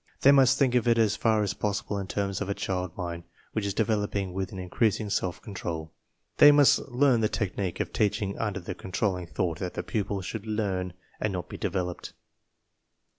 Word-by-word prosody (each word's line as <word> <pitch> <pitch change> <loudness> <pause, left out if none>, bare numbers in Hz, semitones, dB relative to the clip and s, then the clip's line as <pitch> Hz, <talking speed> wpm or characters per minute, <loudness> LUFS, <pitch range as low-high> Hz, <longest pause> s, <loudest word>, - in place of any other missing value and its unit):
They 140 - +7
must 135 -1 +5
think 130 -3 +3
of 125 -1 +2
it 115 -1 +4
as 110 -2 +3
far 110 -2 +2
as 100 -1 -1
possible 100 0 -2
in 95 - -4
terms 100 -1 -2
of 100 - -2
a 100 - -1
child 90 -2 -3
mind 85 -1 -4 0.3
which 105 -2 -1
is 100 - -3
developing 105 -3 0
with 95 0 -3
an 95 - -7
increasing 105 +3 0
self 90 -4 -1
control. 85 -6 -5 0.5
They 145 - +9
must 145 -1 +6
learn 125 -2 +3
the 110 - +2
technique 95 -3 -2
of - - -3
teaching 100 -1 0
under 105 -4 -1
the 90 0 -5
controlling 90 -1 -2
thought 85 -2 -2
that 90 -1 -4
the - - -3
pupil 100 -3 -2
should 110 +3 -6
learn 95 -4 -1 0.3
and 110 - 0
not 90 -2 -4
be - - -7
developed. 90 -2 -3
100 Hz, 195 wpm, -27 LUFS, 90-110 Hz, 0.5 s, They